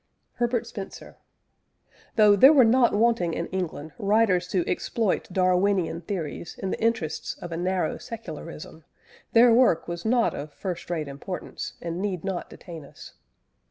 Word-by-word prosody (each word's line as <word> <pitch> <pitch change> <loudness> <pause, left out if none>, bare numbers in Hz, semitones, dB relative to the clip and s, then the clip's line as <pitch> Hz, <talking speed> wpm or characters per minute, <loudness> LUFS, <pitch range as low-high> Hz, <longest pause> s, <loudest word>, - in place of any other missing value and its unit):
HERBERT 240 -1 0
SPENCER. 195 -2 -9 1.0
Though 210 -2 +6
there 265 +8 +8
were 270 -6 +6
not 240 -1 +4
wanting 210 -7 +2
in 170 - -2
England 160 -5 -4
writers 200 -4 +2
to 180 -1 -1
exploit 210 0 -1
Darwinian 185 -2 +1
theories 170 -3 -5
in 190 - -3
the - - -4
interests 220 -9 -1
of 175 - -8
a 165 - -3
narrow 180 +1 -1
secularism, 165 -7 -9 0.5
their 235 0 +7
work 230 -9 +4
was 170 0 -5
not 235 +1 +2
of 145 +1 -6
first 180 -4 -5
rate 160 -4 -2
importance, 140 +7 -6
and 170 +1 -3
need 195 -4 -2
not 190 -2 -3
detain 165 -4 -10
us. 140 - -13
185 Hz, 150 wpm, -26 LUFS, 170-225 Hz, 1.0 s, there